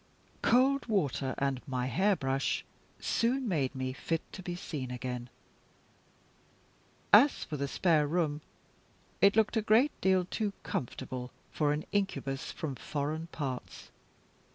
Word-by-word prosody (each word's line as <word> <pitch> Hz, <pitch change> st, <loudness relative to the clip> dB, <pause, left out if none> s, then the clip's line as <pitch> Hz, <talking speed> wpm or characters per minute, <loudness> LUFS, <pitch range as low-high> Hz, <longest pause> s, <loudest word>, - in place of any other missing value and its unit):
Cold 265 Hz, +3 st, +3 dB
water 145 Hz, -, 0 dB
and 135 Hz, -2 st, 0 dB
my 130 Hz, -2 st, -1 dB
hairbrush 135 Hz, -, +1 dB, 0.3 s
soon 250 Hz, +2 st, +1 dB
made 140 Hz, -8 st, 0 dB
me 130 Hz, 0 st, -2 dB
fit 165 Hz, +4 st, -2 dB
to -, -, -7 dB
be 175 Hz, -1 st, -4 dB
seen 145 Hz, -7 st, -5 dB
again. 125 Hz, -1 st, -4 dB, 1.8 s
As 255 Hz, +8 st, +7 dB
for 150 Hz, -, -5 dB
the 140 Hz, -1 st, -1 dB
spare 155 Hz, -1 st, +2 dB
room, 155 Hz, -2 st, 0 dB, 0.8 s
it 200 Hz, 0 st, +6 dB
looked 220 Hz, +1 st, +3 dB
a -, -, +3 dB
great 225 Hz, +7 st, +4 dB
deal 190 Hz, -1 st, +3 dB
too 205 Hz, +2 st, -2 dB
comfortable 125 Hz, 0 st, -4 dB, 0.2 s
for 150 Hz, -2 st, +1 dB
an 150 Hz, +1 st, -2 dB
incubus 140 Hz, -9 st, -1 dB
from 155 Hz, -4 st, -4 dB
foreign 155 Hz, +4 st, -3 dB
parts. 135 Hz, -7 st, -6 dB
155 Hz, 130 wpm, -31 LUFS, 135-200 Hz, 1.8 s, As